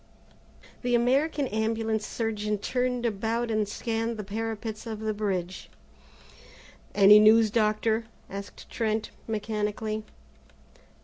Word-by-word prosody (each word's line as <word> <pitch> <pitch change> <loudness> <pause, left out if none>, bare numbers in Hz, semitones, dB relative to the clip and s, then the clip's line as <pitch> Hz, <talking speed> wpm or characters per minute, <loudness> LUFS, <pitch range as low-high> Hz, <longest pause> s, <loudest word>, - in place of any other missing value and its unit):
The 245 -1 +1
American 275 +4 +2
Ambulance 220 0 -1
surgeon 215 -2 -2
turned 250 +3 -1
about 230 +2 -1
and 215 -1 +1
scanned 225 +1 -2
the 210 - -4
parapets 220 +2 -4
of 220 -2 -5
the 220 0 -1
bridge. 190 -4 -3 1.3
"Any 205 +1 +8
news, 215 0 +6
Doctor," 220 +1 +1 0.2
asked 200 +1 -8
Trent 220 -1 -1 0.2
mechanically. 215 0 -2
220 Hz, 105 wpm, -27 LUFS, 210-230 Hz, 1.3 s, Any